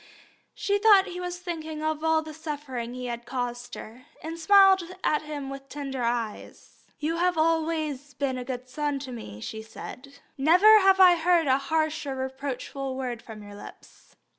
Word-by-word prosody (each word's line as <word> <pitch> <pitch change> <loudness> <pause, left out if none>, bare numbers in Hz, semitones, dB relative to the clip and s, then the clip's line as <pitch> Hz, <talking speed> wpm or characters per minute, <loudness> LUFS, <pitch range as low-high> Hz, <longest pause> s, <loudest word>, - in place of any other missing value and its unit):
She 405 0 0
thought 405 -2 +6
he 360 - -7
was 355 0 -4
thinking 320 -3 -6
of 310 0 -1
all 320 0 +2
the 310 0 -9
suffering 290 -6 -5
he 250 0 -5
had 235 -1 -5
caused 245 -1 -4
her, 245 +5 -11 0.2
and 325 +1 -6
smiled 390 +2 +6 0.2
at 300 - +2
him 290 -3 -6
with 275 0 -9
tender 275 -3 -5
eyes. 235 -2 -4
"You 320 +2 -2
have 355 0 +1
always 315 -3 0
been 265 -3 -2
a - - -4
good 250 0 -6
son 290 +2 -2
to 270 -1 -7
me," 105 - -8
she 220 - -6
said. 265 +5 -10 0.2
"Never 365 +9 +7
have 385 -1 +4
I 360 -2 +8
heard 340 0 +3
a 265 -1 +3
harsh 310 +1 -1
or 270 - -3
reproachful 265 0 -4
word 245 -3 -4
from 215 -2 -11
your 205 0 -11
lips." 205 - -14
290 Hz, 180 wpm, -26 LUFS, 255-325 Hz, 0.2 s, I